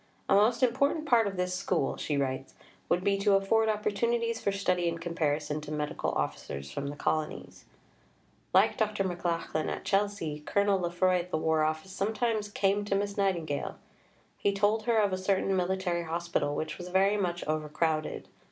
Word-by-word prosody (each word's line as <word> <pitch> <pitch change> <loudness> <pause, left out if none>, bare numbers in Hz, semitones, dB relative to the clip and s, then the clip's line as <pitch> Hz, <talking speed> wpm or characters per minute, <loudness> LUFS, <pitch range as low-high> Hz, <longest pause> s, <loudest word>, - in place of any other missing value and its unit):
"A - - +3
most 215 +6 +4
important 280 +6 +2
part 235 -7 +4
of 195 -2 -4
this 180 0 -1
School," 180 -5 0
she 145 - -2
writes, 130 -1 -2 0.3
would 175 +1 +2
be 200 0 +2
to 200 0 +4
afford 220 +3 +3
opportunities 230 +2 0
for 200 - +1
study 180 -3 +1
and 165 0 -4
comparison 155 -3 -1
to 150 0 -8
Medical 150 -1 -2
Officers 70 -1 -3
from 140 - -4
the 145 - -5
Colonies. 155 +1 -3 0.9
Like - - +4
Dr. 215 -2 0
McLachlan 170 -3 -2
at - - -5
Chelsea, 195 -7 0
Colonel 200 +5 +1
Lefroy 180 +1 +2
at 175 +1 -6
the 170 - 0
War 160 0 +1
Office 155 +4 -2
sometimes 215 +2 -1
"came 200 0 +1
to 200 - 0
Miss 200 0 -1
Nightingale." 170 -7 -1 0.6
He 200 - +2
told 210 +2 +1
her 235 -2 +2
of 205 -3 +3
a 185 - -1
certain 195 0 +1
military 180 -1 0
hospital 165 -3 -1
which 155 - -4
was 175 - -6
very 195 +3 +3
much 175 -4 -1
overcrowded. 155 +1 -1
185 Hz, 170 wpm, -29 LUFS, 155-205 Hz, 0.9 s, most